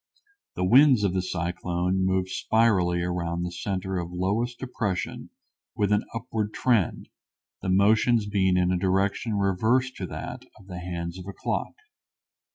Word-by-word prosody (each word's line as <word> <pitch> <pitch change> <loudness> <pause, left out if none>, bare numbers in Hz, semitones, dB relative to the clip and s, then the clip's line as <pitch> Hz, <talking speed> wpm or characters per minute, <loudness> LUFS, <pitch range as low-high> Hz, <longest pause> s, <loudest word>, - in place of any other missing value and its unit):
The 90 - 0
winds 130 +1 +6
of 95 -3 +1
the 95 - +1
cyclone 90 +1 -1
move 95 0 +1
spirally 95 -3 +2
around 85 -1 -2
the 90 - -3
center 95 +1 -3
of 85 0 -5
lowest 105 +7 -1
depression 105 -7 -3 0.5
with 105 -1 +1
an 105 - +2
upward 110 -2 -3
trend, 115 -8 +1 0.5
the 95 - -3
motions 110 +4 +4
being 95 -3 +2
in 90 0 +2
a 90 - +1
direction 95 +4 0
reversed 110 +7 +1
to 95 - -4
that - - -6 0.2
of 95 - -17
the 90 -2 -7
hands 85 0 -5
of 90 - -9
a 100 - -6
clock. - - -3
95 Hz, 155 wpm, -26 LUFS, 90-105 Hz, 0.5 s, winds